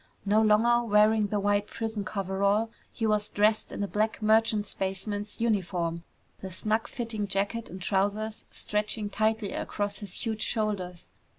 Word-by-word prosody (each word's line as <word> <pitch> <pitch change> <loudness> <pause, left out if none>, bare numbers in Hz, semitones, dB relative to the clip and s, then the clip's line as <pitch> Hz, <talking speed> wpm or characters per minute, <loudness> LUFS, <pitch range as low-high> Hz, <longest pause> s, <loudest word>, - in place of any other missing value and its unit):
No 210 +2 +4
longer 230 +2 +4
wearing 210 0 +5
the 205 0 -1
white 205 +1 +1
prison 225 -2 -3
coverall, 200 +3 0 0.2
he 225 - -2
was 210 -1 +1
dressed 215 +1 +2
in - - -3
a - - -1
black 215 +2 0
merchant 215 -1 +3
spaceman's 205 +2 -3
uniform, 180 -7 0 0.4
the 190 - -6
snug 215 +4 0
fitting 225 -4 -3
jacket 200 +4 -1
and 185 - -8
trousers 205 +4 -1
stretching 210 0 -2
tightly 220 0 0
across 205 -1 -3
his 200 -4 -5
huge 220 -1 -2
shoulders. 200 -7 -2
210 Hz, 150 wpm, -28 LUFS, 200-220 Hz, 0.4 s, wearing